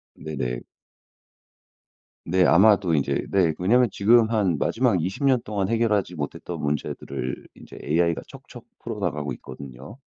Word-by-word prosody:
네네. 60 -6 -4 1.6
네 90 +2 +3
아마도 95 -1 +5
인제 70 -3 0
네 90 -5 +3
왜냐하면 120 +6 +3
지금 115 +2 +4
한 95 -8 +1
마지막 115 - +1
20 95 +10 -3
년 130 -3 +3
동안 100 -3 -2
해결하지 105 -6 0
못했던 70 -2 -5
문제들을 70 -3 -4
인제 - - -13
AI가 85 +2 +1
척척 - - -13 0.2
풀어나가고 75 -1 -3
있거든요. 65 - -11
90 Hz, 290 characters per minute, -24 LUFS, 75-110 Hz, 1.6 s, 아마도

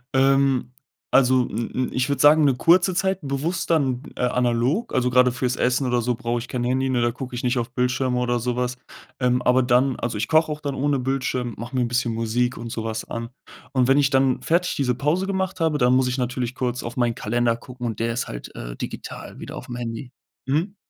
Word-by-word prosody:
Ähm, 135 -1 +3 0.4
also, 130 -1 +4
m 115 +3 -3
m 130 0 -1
ich 130 +1 0
würde 140 -2 0
sagen, 150 +1 +7
'ne 135 -3 +3
kurze 175 +7 +4
Zeit, 190 0 +1
bewusst 150 +6 -2
dann, 135 -6 +1
äh, - - -5
analog. 125 - +1
Also, 125 -1 +2
grade 125 0 +4
fürs 125 0 -1
Essen 125 +2 +1
oder 125 -1 +1
so 120 +1 0
brauch 120 0 -2
ich 120 - -7
kein 125 0 -3
Handy, 130 +2 0
nur 125 -2 +1
da 120 0 +2
guck 130 +1 -7
ich 120 - -4
nicht 125 0 +1
auf 120 +1 -4
Bildschirme 125 0 0
oder 120 -1 0
so 120 +1 -2
was. 125 0 -2 0.4
Ähm, 125 -1 +2
aber 125 +1 +4
dann 125 +2 +3
also, 115 -3 -2
ich 105 +1 -1
koche 155 0 +3
auch 150 0 -5
dann 140 -3 -3
ohne 140 0 +1
Bildschirm, 130 -2 -2
mache 120 +4 -7
mir 130 - +2
'n 120 - +1
bisschen 120 -1 0
Musik 115 +2 0
und 115 0 -6
so 115 -2 -4
was 110 -1 -3
an. 115 0 -4 0.4
Und 130 -2 +2
wenn 135 +1 +4
ich 140 -2 +4
dann 135 -1 +2
fertig 170 +2 +1
diese 130 -3 +1
Pause 150 +8 0
gemacht 190 -2 -2
habe, 160 -2 +1
dann 125 -1 +3
muss 130 0 +3
ich 125 +1 -1
natürlich 125 -1 -2
kurz 125 -1 -2
auf 115 - -6
meinen 120 -2 +1
Kalender 120 0 0
gucken 125 +1 -9
und 115 - -4
der 115 +1 0
ist 120 - -2
halt, - - -8
äh, - - -7
digital - - -7
wieder - - -8
au'fm 120 - -7
Handy. 120 +1 -5 0.4
Mhm. 165 +9 0
125 Hz, 235 wpm, -23 LUFS, 120-135 Hz, 0.4 s, sagen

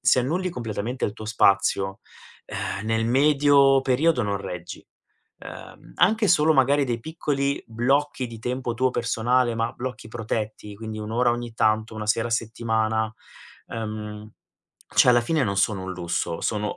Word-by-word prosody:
se 130 - +4
annulli 175 +9 -1
completamente 120 -2 -4
il 105 - -1
tuo 110 - -10
spazio, 100 -2 +2 0.5
uhm, 100 +2 -4
nel 115 0 +1
medio 140 +1 +5
periodo 135 +1 +2
non 100 -1 -1
reggi. 90 -3 -7 0.5
Uhm, - - -11
anche 215 +3 +3
solo 160 -3 +5
magari 140 0 +3
dei 120 -2 -2
piccoli 140 -1 -2
blocchi 130 +4 0
di 115 -1 -9
tempo 125 +1 -3
tuo 130 +2 +1
personale, 120 +1 +1
ma 115 +1 -1
blocchi 125 -3 -6
protetti, 110 -2 -4
quindi 110 0 -6
1 105 +1 -6
ora 120 +1 +2
ogni 120 -1 -5
tanto, 110 0 +1
1 105 - -5
sera 115 +2 +1
a - - -8
settimana, 110 -1 -1 0.6
ehm, 105 -1 -6 0.6
cioè, - - +6
alla 120 -1 +6
fine 155 +4 +1
non 100 -3 -2
sono 100 -1 +1
un 95 - -4
lusso, 85 -1 -3
sono 105 -1 -2
115 Hz, 160 wpm, -24 LUFS, 110-130 Hz, 0.6 s, cioè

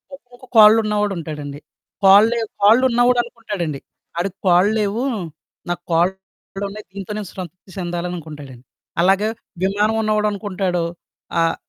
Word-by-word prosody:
ఒకొక్క 250 -1 -18
కాళ్ళు 215 +1 +9
ఉన్నవాడుంటాడండి. 165 -9 -3 0.4
కాళ్ళు 200 +3 +7
లే - - 0 0.2
కాళ్ళున్నవాడనుకుంటాడండి 235 - +2 0.4
ఆడికి 190 +2 -2
కాళ్ళు 180 +4 +5
లేవు, 210 +4 -1 0.7
నాకు 175 0 -3
కాళ్ళున్నాయి. 190 +3 -3
దీంతో 200 +1 -7
నేను 205 -3 -5
సంతృప్తి 185 +1 -9
చెందాలనుకుంటాడండి. 165 -7 -6 0.4
అలాగ 195 +3 +4 0.4
విమానం 205 +3 +1
ఉన్నవాడు 215 -1 +1
అనుకుంటాడు, 190 -4 -2 0.6
ఆహ్, 165 0 +2
195 Hz, 105 wpm, -20 LUFS, 175-215 Hz, 0.7 s, కాళ్ళు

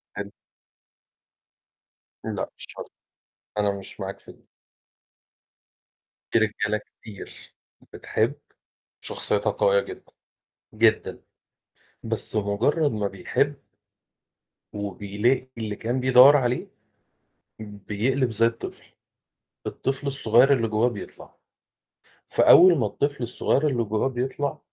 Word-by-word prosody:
حلو. 100 0 -6 1.9
لأ - - -3
مش - - -9
شرط، - - -10 0.7
أنا 100 -1 +1
مش 95 - -12
معاك 95 0 -5
في - - -14
دي. - - -26 1.9
في - - +3
رجالة 110 0 0
كتير 105 -3 -13 0.4
بتحب، - - -1 0.7
شخصيتها 105 -1 -1
قوية 100 0 +3
جدًا، - - -10 0.7
جدًا، 110 0 +1 0.8
بس - - -5
مجرّد 110 +10 +1
ما 105 -2 -1
بيحب 140 +9 -1 1.1
وبيلاقي 105 +5 -1
اللي 110 -2 -4
كان 120 +5 -2
بيدوّر 130 +3 +7
عليه، 125 -2 -1 0.9
امم 105 -1 -9
بيقلب 125 +4 0
زي 115 +2 +2
الطفل، 115 0 -4 0.8
الطفل 135 +2 -3
الصغيّر 135 0 +4
اللي 115 -4 +1
جوّاه 110 +3 +2
بيطلع، 105 -4 -10 0.9
فأول 175 -2 +7
ما 110 - +1
الطفل 140 +4 -2
الصغيّر 135 +5 0
اللي 120 -4 0
جوّاه 110 +5 0
بيطلع، 135 +4 -3
115 Hz, 100 wpm, -25 LUFS, 105-135 Hz, 1.9 s, بيدوّر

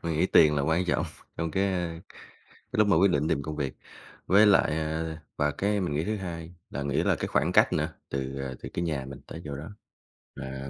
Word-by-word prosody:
Mình 85 -1 -1
nghĩ 80 +4 +2
tiền 75 -5 +6
là 70 - +1
quan 80 +5 +2
trọng, 90 - +1 0.3
trong 80 0 -2
cái 95 +4 +1 0.9
cái - - -9
lúc 105 - +5
mà 100 - +5
quyết 100 +1 +5
định 75 0 +1
tìm 70 - +1
công 75 +1 -5
việc, 70 -3 -3 0.5
với 100 +4 +6
lại, 90 -6 +4
ờ, 80 +1 -2 0.2
và 75 0 +2
cái 100 +6 0
mình 85 -6 -1
nghĩ 75 - 0
thứ 110 +3 -1
hai 85 -3 -6 0.2
là 70 - -4
nghĩ 70 0 0
là - - +3
cái - - -2
khoảng - - +1
cách - - +5
nữa, - - +1 0.2
từ, 70 0 -3
à, 65 -1 -4
từ - - -5
cái - - -1
nhà 75 -5 -2
mình 70 0 -9
tới 85 - -8
chỗ 70 -2 -5
đó, 75 +3 -7 0.7
à 65 +1 -6
80 Hz, 235 wpm, -28 LUFS, 70-90 Hz, 0.9 s, tiền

